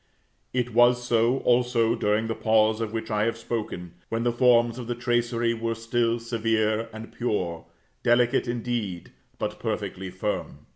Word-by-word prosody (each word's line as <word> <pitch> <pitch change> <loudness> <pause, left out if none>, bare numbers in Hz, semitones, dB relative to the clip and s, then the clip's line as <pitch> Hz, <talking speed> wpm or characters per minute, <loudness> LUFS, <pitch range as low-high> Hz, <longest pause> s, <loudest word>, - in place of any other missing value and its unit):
It 125 -2 -1
was 120 +1 +5
so, 120 +2 +2
also, 120 -2 +3
during 105 0 +1
the 115 - -1
pause 110 0 +2
of 110 -2 -2
which 110 0 -4
I 105 0 +2
have 115 0 -1
spoken, 105 -7 -4 0.2
when 115 +1 -1
the 120 - +2
forms 120 0 +3
of 120 - -6
the 120 - -2
tracery 120 -1 0
were 115 0 -2
still 115 +1 0
severe 115 -1 0
and 110 +1 -9
pure; 90 -8 -2 0.4
delicate 120 0 +3
indeed, 115 -6 -3 0.3
but - - -4
perfectly 95 0 -3
firm. 95 +3 -4
115 Hz, 155 wpm, -26 LUFS, 110-120 Hz, 0.4 s, was